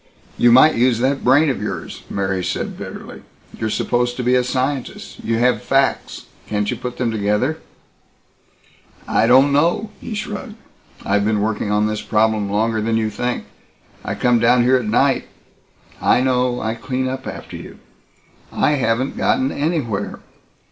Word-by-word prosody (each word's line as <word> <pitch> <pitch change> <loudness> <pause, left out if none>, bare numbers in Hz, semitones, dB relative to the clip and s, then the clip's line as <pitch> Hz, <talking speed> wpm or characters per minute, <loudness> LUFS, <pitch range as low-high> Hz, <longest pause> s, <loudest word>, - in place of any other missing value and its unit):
"You 120 - +4
might 130 +6 +7
use 120 0 +2
that 135 +3 0
brain 140 +4 +4
of - - -5
yours," - - -5
Mary 95 -2 -2
said - - -3
bitterly. - - -9 0.3
"You're 110 - -3
supposed 120 +2 0
to 125 - -2
be 125 +1 +2
a 125 0 +3
scientist. 130 +1 -3
You 115 0 0
have 125 +2 +2
facts. 135 0 0 0.2
Can't 105 -1 -1
you - - -2
put 125 -1 -6
them 120 -2 0
together?" 110 +8 0 1.5
"I 110 - +2
don't 135 +4 +6
know." 170 +9 +1
He 220 - -6
shrugged, 215 +2 -5 0.5
"I've 100 0 +1
been 105 0 +1
working 105 0 -1
on 105 0 +2
this 105 0 -2
problem 110 -2 +1
longer 110 +2 0
than 115 +1 0
you 110 -1 -1
think. 125 +4 -2 0.6
I - - -3
come 120 -1 +2
down 120 +1 +4
here 130 +2 +4
at 125 - -3
night 130 +5 +1 0.4
" - - -28
"I - - +4
know. 125 -1 +1
I 110 0 -2
clean 130 +2 -3
up 130 0 -5
after - - -8
you." - - -10 0.7
"I - - +1
haven't 130 -2 0
gotten 130 +1 +1
anywhere. 140 - -2
125 Hz, 165 wpm, -19 LUFS, 110-130 Hz, 1.5 s, might